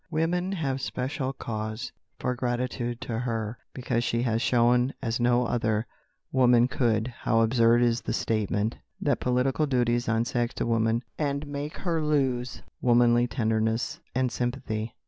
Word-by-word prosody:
Women 175 +4 0
have 135 -7 -2
special 130 +1 -2
cause 110 -2 -5 0.3
for 125 - -1
gratitude 120 -1 -2
to 115 -2 -3
her, 115 -2 -3
because 120 -2 -1
she 120 0 0
has 115 -2 +1
shown, 125 +1 +3
as 115 -2 -2
no 120 +1 +3
other 110 -2 0 0.5
woman 125 -2 +5
could, 120 -3 +1
how 115 0 +2
absurd 115 +1 +4
is 120 -1 +2
the - - -3
statement 110 0 0 0.2
that 140 -4 +1
political 125 +4 +1
duties 120 -2 +1
unsex 115 +1 0
a - - 0
woman, 115 +1 +1 0.2
and 145 -1 -1
make 145 +1 -5
her 170 -3 -1
lose 135 -5 0 0.2
womanly 120 0 +4
tenderness 115 +5 0 0.2
and 130 -1 +1
sympathy. 120 -2 -3
120 Hz, 145 wpm, -27 LUFS, 115-130 Hz, 0.5 s, woman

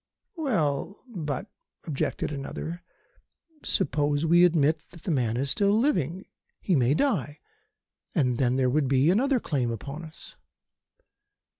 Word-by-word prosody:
"Well, 200 - -1
but," 165 - -4 0.4
objected 150 -1 -2
another, 155 +4 -5 0.8
"suppose 145 +1 +1
we 175 +2 +6
admit 160 -3 +2
that 170 -3 -15
the 180 - -1
man 120 -6 +1
is 135 +2 -1
still 200 +1 +3
living. 190 - 0 0.3
He 185 - +1
may 130 +1 +3
die, 160 - 0 0.8
and 125 -7 +1
then 125 -2 +2
there 130 -1 +2
would 145 0 +2
be 135 +4 +4
another 260 +6 +2
claim 135 - -1
upon 140 +8 -6
us." 160 -1 -12
155 Hz, 130 wpm, -27 LUFS, 135-180 Hz, 0.8 s, we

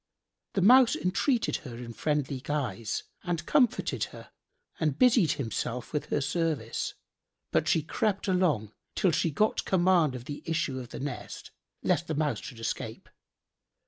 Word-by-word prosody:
The 195 - +1
Mouse 245 +3 +7
entreated 230 +7 +1
her 120 -6 -9
in 120 -1 -7
friendly 145 +1 -1
guise 130 -6 -2 0.2
and 170 -3 -2
comforted 250 - +2
her - - -12 0.5
and 150 -3 0
busied 230 - +5
himself 120 -1 -3
with 150 - -2
her 145 - 0
service; 145 -5 -1 0.6
but - - +2
she 160 - +3
crept 205 +5 -1
along 155 - +1 0.2
till 185 - +3
she 165 - +1
got 210 +9 +1
command 175 -6 +3
of 125 -1 -7
the 145 +3 -6
issue 150 -5 -1
of 125 -2 -8
the - - -7
nest, 140 -2 -6 0.3
lest 170 - +1
the 160 - -2
Mouse 150 0 0
should 120 - -9
escape. 115 - -4
155 Hz, 150 wpm, -29 LUFS, 130-185 Hz, 0.6 s, Mouse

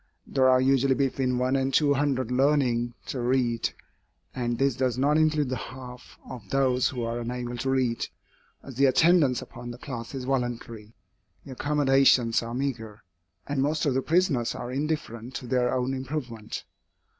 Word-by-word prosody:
There 130 -1 +3
are 130 0 +5
usually 135 0 +3
between 130 -2 0
one 130 +2 +1
and 135 0 +1
two 145 0 +3
hundred 135 -3 0
learning 125 -3 +2
to 130 - -4
read, 120 -1 +1 0.6
and 120 -2 -2
this 135 0 +1
does 125 -1 0
not 145 +3 +2
include 155 -3 +2
the 130 - -1
half 125 -1 -9
of 125 -4 -9
those 130 -2 +2
who 125 -3 -4
are 115 +1 -2
unable 120 +1 -4
to 130 +3 -2
read, 130 -3 0 0.6
as 135 - -9
the 135 +3 +3
attendance 145 0 +4
upon 120 - -10
the 120 - -7
class 125 -1 -7
is 130 - -4
voluntary, 120 -4 -3 0.5
the 135 - -9
accommodations 135 -4 +3
are 115 0 -5
meagre, 115 -6 -4 0.4
and 140 -2 -1
most 150 +3 0
of 140 - +2
the 130 - +1
prisoners 155 -7 +1
are 120 - -5
indifferent 130 -4 -3
to - - -5
their 125 0 +1
own 130 +1 0
improvement. 130 -5 -5
130 Hz, 170 wpm, -26 LUFS, 120-135 Hz, 0.6 s, are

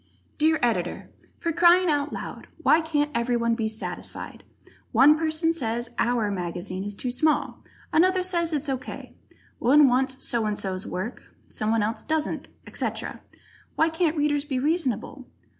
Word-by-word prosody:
_ - - -38
Dear 315 +1 +4
Editor: 240 -1 -1 0.3
For 335 - -2
crying 345 +2 +5
out 290 -2 +1
loud, - - -7 0.2
why 320 - +5
can't 300 -2 0
everyone 235 -1 +1
be 225 -1 -1
satisfied! 220 0 -5 0.5
One 295 +3 +7
person 320 +1 +1
says 240 -5 -2
"our" 230 -3 +1
mag 180 -3 -3
is 175 - -6 0.3
too 250 - -2
small, 300 +5 +1 0.3
another 370 +3 +4
says 340 -2 0
it's 300 -1 -1
O. 270 -1 0
K.; - - -9 0.5
one 285 +4 +6
wants 260 +1 0
so 230 -2 0
and 210 -1 -2
so's 190 -1 -3
work, 200 +7 -5 0.2
someone 220 0 0
else 220 +2 -2
doesn't, 315 -1 -2 0.2
etc. - - -4 0.5
Why 320 - +3
can't 325 0 0
Readers 290 -1 +1
be 285 -3 -3
reasonable? 270 - -1
280 Hz, 155 wpm, -25 LUFS, 235-315 Hz, 0.5 s, One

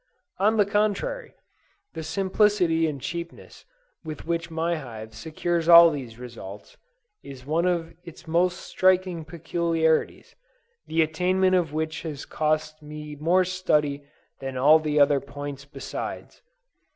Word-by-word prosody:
On 215 +3 +3
the 205 - +4
contrary, 210 - -1 0.6
the - - -5
simplicity 185 -1 +2
and 145 -3 -4
cheapness 170 +5 -7 0.4
with 155 -2 -7
which 170 0 -2
my 165 +1 -1
hive 110 -6 -9
secures 165 +7 -2
all 170 -1 +10
these 125 -6 -7
results, 115 -5 -10 0.5
is 130 -2 -11
one 165 +5 +1
of 170 -2 -1
its 170 +1 -12
most 175 +2 +1
striking 185 -2 +1
peculiarities, 165 0 -1 0.5
the 160 0 +2
attainment 185 +4 +1
of 175 -5 +2
which 155 +1 -3
has 150 -4 -6
cost 155 0 -1
me 150 0 -8
more 170 +5 +2
study 150 -6 0 0.4
than 135 -1 -5
all 150 +5 +6
the 150 -1 0
other 145 0 +5
points 140 0 -8
besides. 140 -1 -7
160 Hz, 130 wpm, -25 LUFS, 145-175 Hz, 0.6 s, all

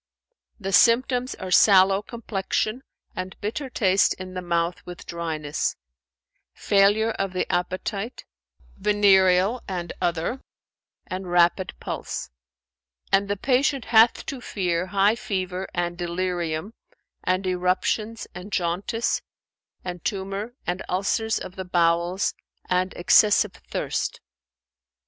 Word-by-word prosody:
"The 195 -2 -4
symptoms 245 +5 +4
are 185 -1 -7
sallow 195 0 +6
complexion 215 +1 -3 0.3
and 185 +1 -6
bitter 245 +7 -4
taste 195 -5 +3
in 185 0 -8
the 185 - -4
mouth 170 0 -1
with 180 0 -10
dryness; 160 -3 -3 0.8
failure 205 +3 +3
of 195 -3 -3
the 185 - -1
appetite, 190 +5 -3 0.5
venereal 195 +1 +4
and 180 -3 -4
other, 175 +8 -1 0.6
and 185 0 -5
rapid 175 +1 +2
pulse; - - -5 0.8
and 200 +1 +3
the 205 0 -1
patient 270 +3 +1
hath 225 +1 +6
to 270 -3 -5
fear 180 -5 -1
high 200 +2 +3
fever 190 -4 -3
and 175 0 -2
delirium 175 +1 -2 0.5
and 185 +1 0
eruptions 185 +5 0
and 180 +4 -9
jaundice 195 +6 -1 0.6
and 180 -2 -6
tumour 195 +4 -3
and 180 +1 -2
ulcers 210 +4 0
of 185 - -7
the 190 - -4
bowels 175 +1 +1 0.3
and 185 0 +1
excessive 205 +2 +4 0.2
thirst." - - -2
190 Hz, 110 wpm, -24 LUFS, 180-210 Hz, 0.8 s, sallow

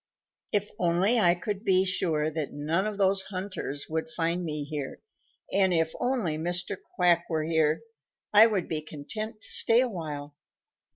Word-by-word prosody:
"If 205 0 0
only 180 +7 +3
I 175 -4 +4
could 200 +3 -4
be 190 -3 +3
sure 160 -4 0
that 155 -2 -3
none 160 +7 -1
of 210 -1 -4
those 195 -1 +3
hunters 185 -7 -5
would 160 +7 -3
find 175 -5 -1
me 150 -3 -3
here, 145 -2 -5 0.5
and 190 -1 +4
if 165 -2 +1
only 230 -12 0
Mr. 175 +2 -2 0.2
Quack 175 - +3
were 160 -2 0
here, 160 -1 +2 0.5
I 215 +2 +9
would 205 -6 -1
be 155 -2 -2
content 215 +9 -6
to - - -3
stay 230 +1 +5
a 255 - +3
while." 150 -8 -6
175 Hz, 165 wpm, -28 LUFS, 155-200 Hz, 0.5 s, I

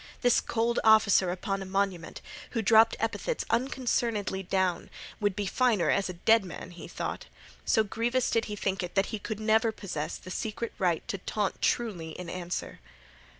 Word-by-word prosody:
This 245 -2 +4
cold 235 +1 0
officer 215 -4 +5
upon 195 +2 -2
a - - -5
monument, 190 -3 -2 0.4
who 225 - +1
dropped 225 +2 +6
epithets 340 - -2
unconcernedly 235 -6 0
down, 185 -2 -1 0.3
would 205 -2 0
be 205 0 -2
finer 220 -2 +2
as 200 -1 +1
a - - -4
dead 220 +5 +4
man, 180 0 -8
he 175 -1 -10
thought. - - -5 0.4
So 220 - +3
grievous 235 +4 0
did 230 - +2
he 210 - -5
think 195 -1 -1
it 180 +1 -6
that 195 0 +3
he 215 - -2
could 215 +1 -5
never 220 +1 +3
possess 180 -8 -5
the 185 - -10
secret 220 +3 -4
right 175 -4 0
to 200 - -3
taunt 205 +1 -2
truly 180 -9 -1
in 180 -2 -6
answer. 180 0 -5
205 Hz, 175 wpm, -29 LUFS, 185-225 Hz, 0.4 s, dropped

